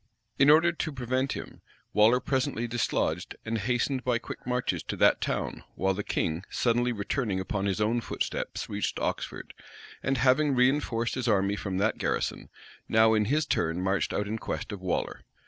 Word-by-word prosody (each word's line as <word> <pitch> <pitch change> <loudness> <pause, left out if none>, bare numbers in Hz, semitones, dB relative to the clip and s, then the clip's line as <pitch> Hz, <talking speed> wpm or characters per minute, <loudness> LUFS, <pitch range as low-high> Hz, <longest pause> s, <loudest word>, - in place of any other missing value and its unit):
In 140 +1 +6
order 160 +3 +6
to 160 -1 -3
prevent 130 0 -1
him, - - -8 0.3
Waller 110 +4 +5
presently 130 -3 -1
dislodged, 100 -7 -1
and 115 0 -1
hastened 125 +4 0
by 125 -2 +2
quick 115 - -9
marches 125 0 0
to - - -5
that - - +4
town - - -2
while 95 0 +1
the 100 +2 -3
king, 80 -1 -1
suddenly 120 +1 +1
returning 105 -1 -1
upon 95 +1 -2
his 100 +1 -1
own 115 +3 +1
footsteps - - -3
reached - - -2
Oxford; - - -3 0.5
and 135 0 0
having 135 +3 +3
reënforced 125 -2 +2
his 130 -2 -2
army 100 -2 +2
from 95 -2 -3
that 105 +3 +1
garrison, - - -2 0.4
now 110 0 +5
in 105 -1 +3
his 150 +7 +1
turn 80 0 0
marched 95 +1 0
out 105 - -1
in 110 +2 -3
quest - - -4
of 100 -2 -6
Waller. 90 -2 -2
115 Hz, 175 wpm, -28 LUFS, 100-130 Hz, 0.5 s, In